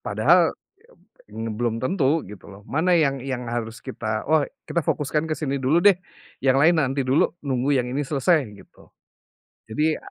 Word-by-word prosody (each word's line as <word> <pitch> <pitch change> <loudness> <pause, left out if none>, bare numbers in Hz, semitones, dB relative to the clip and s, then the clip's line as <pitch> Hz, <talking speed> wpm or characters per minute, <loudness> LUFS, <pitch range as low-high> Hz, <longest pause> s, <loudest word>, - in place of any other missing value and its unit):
Padahal - - +3 0.8
ya, - - -17
m 115 0 -4
belum 115 -1 -1
tentu, 155 0 +1
gitu 105 - -12
loh. 100 0 -13
Mana 160 - +1
yang 140 -5 +2
yang 130 -1 -4
harus 115 -1 -4
kita 110 -4 -4
oh, 155 -3 +3 0.2
kita 170 - 0
fokuskan 150 +2 -1
ke 155 - -1
sini 140 -3 -2
dulu 145 +7 +2
deh, 195 -2 +6 0.4
yang 130 0 +2
lain 165 +1 +5
nanti 135 -1 0
dulu, 130 +6 +1
nunggu 135 0 0
yang 125 -1 0
ini 140 +1 -2
selesai, 150 0 +2
gitu. 100 - -18 0.8
Jadi, 155 +7 0
135 Hz, 170 wpm, -23 LUFS, 125-155 Hz, 0.8 s, deh